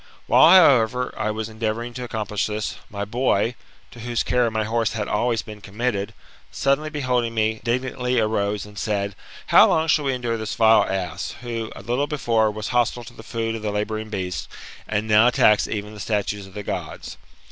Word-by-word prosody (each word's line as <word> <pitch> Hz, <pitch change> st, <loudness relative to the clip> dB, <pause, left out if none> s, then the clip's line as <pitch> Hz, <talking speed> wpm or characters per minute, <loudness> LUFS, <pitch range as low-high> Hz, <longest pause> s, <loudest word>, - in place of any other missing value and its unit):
While, -, -, +6 dB
however, 125 Hz, -6 st, +4 dB
I 110 Hz, 0 st, -2 dB
was 110 Hz, 0 st, -3 dB
endeavouring 115 Hz, +2 st, -3 dB
to 125 Hz, -, -6 dB
accomplish 110 Hz, -3 st, -2 dB
this, 105 Hz, 0 st, -4 dB
my 100 Hz, -1 st, -4 dB
boy, 115 Hz, 0 st, +1 dB, 0.4 s
to 120 Hz, -, -13 dB
whose 120 Hz, 0 st, -1 dB
care 125 Hz, -2 st, +2 dB
my 110 Hz, 0 st, -1 dB
horse 115 Hz, +1 st, 0 dB
had 105 Hz, -2 st, -3 dB
always 115 Hz, +1 st, 0 dB
been 105 Hz, -2 st, -11 dB
committed, 100 Hz, 0 st, -3 dB, 0.4 s
suddenly 140 Hz, +3 st, 0 dB
beholding 125 Hz, -6 st, -1 dB
me, 110 Hz, 0 st, +1 dB
indignantly 125 Hz, 0 st, -1 dB
arose 105 Hz, -2 st, 0 dB
and 105 Hz, -1 st, -10 dB
said, 100 Hz, -2 st, -1 dB, 0.3 s
How -, -, +7 dB
long 160 Hz, 0 st, +2 dB
shall 150 Hz, -2 st, +2 dB
we 135 Hz, -1 st, +1 dB
endure 120 Hz, -2 st, -2 dB
this 110 Hz, -1 st, -4 dB
vile 110 Hz, 0 st, +5 dB
ass, 90 Hz, -4 st, -3 dB
who, 115 Hz, -2 st, -4 dB
a -, -, -10 dB
little 125 Hz, +5 st, 0 dB
before, 115 Hz, -7 st, +1 dB
was 110 Hz, 0 st, -5 dB
hostile 120 Hz, 0 st, +1 dB
to 120 Hz, -, -12 dB
the 110 Hz, -, -12 dB
food 115 Hz, 0 st, -3 dB
of 115 Hz, -, -5 dB
the 105 Hz, -, -2 dB
labouring 110 Hz, +1 st, -3 dB
beasts, 90 Hz, -6 st, -4 dB, 0.4 s
and 110 Hz, 0 st, -1 dB
now 110 Hz, +2 st, +6 dB
attacks 105 Hz, -3 st, +4 dB
even 105 Hz, 0 st, -5 dB
the 105 Hz, -, -11 dB
statues 105 Hz, -1 st, -2 dB
of 95 Hz, -, -17 dB
the 105 Hz, -, -5 dB
Gods? -, -, -6 dB
110 Hz, 190 wpm, -23 LUFS, 105-120 Hz, 0.4 s, How